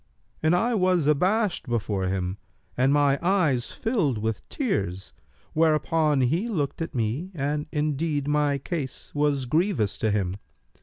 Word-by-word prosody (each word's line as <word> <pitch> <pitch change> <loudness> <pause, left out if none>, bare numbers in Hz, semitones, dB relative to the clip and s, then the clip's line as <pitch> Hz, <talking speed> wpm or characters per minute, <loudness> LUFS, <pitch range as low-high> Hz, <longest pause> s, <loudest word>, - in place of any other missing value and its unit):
And 155 +2 +3
I 235 +7 +1
was 185 -6 +2
abashed 185 +5 +1
before 105 -5 -1
him 95 +1 -2 0.4
and 130 +2 +3
my 145 -1 +3
eyes 165 -9 +2
filled 190 - 0
with 110 0 -3
tears; 100 - -2 0.4
whereupon 155 -2 +2
he 165 - +1
looked 155 -8 -2
at 165 - -4
me 120 +10 -1
and 150 +1 -2
indeed 150 -1 -1
my 150 -1 +2
case 140 -1 -5
was 145 -2 +1
grievous 145 - 0
to 110 - +1
him. 100 -2 -1
145 Hz, 140 wpm, -26 LUFS, 120-165 Hz, 0.4 s, And